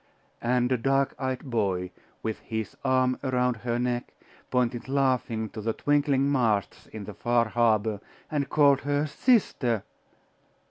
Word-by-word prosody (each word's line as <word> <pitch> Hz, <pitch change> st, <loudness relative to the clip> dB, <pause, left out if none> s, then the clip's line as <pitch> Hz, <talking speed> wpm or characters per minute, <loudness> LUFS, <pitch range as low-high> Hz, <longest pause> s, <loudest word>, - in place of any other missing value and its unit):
And 125 Hz, +1 st, +1 dB
a 125 Hz, -, +2 dB
dark 135 Hz, +2 st, +1 dB
eyed 130 Hz, -2 st, -2 dB
boy, 95 Hz, -8 st, -1 dB, 0.3 s
with 110 Hz, -1 st, -3 dB
his 110 Hz, -3 st, -5 dB
arm 130 Hz, -1 st, +2 dB
around 125 Hz, -2 st, +1 dB
her 120 Hz, +1 st, -2 dB
neck, 120 Hz, 0 st, -2 dB, 0.3 s
pointed 125 Hz, 0 st, 0 dB
laughing 130 Hz, -5 st, +1 dB
to 110 Hz, -, -7 dB
the 110 Hz, +1 st, -1 dB
twinkling 140 Hz, 0 st, +2 dB
masts 110 Hz, -, 0 dB
in 110 Hz, -2 st, -8 dB
the 105 Hz, -, -8 dB
far 120 Hz, +1 st, +1 dB
harbour, 110 Hz, -3 st, +2 dB, 0.3 s
and 140 Hz, -3 st, -1 dB
called 140 Hz, -2 st, +4 dB
her 145 Hz, +1 st, 0 dB
sister.... 150 Hz, -, +1 dB
125 Hz, 140 wpm, -27 LUFS, 110-135 Hz, 0.3 s, called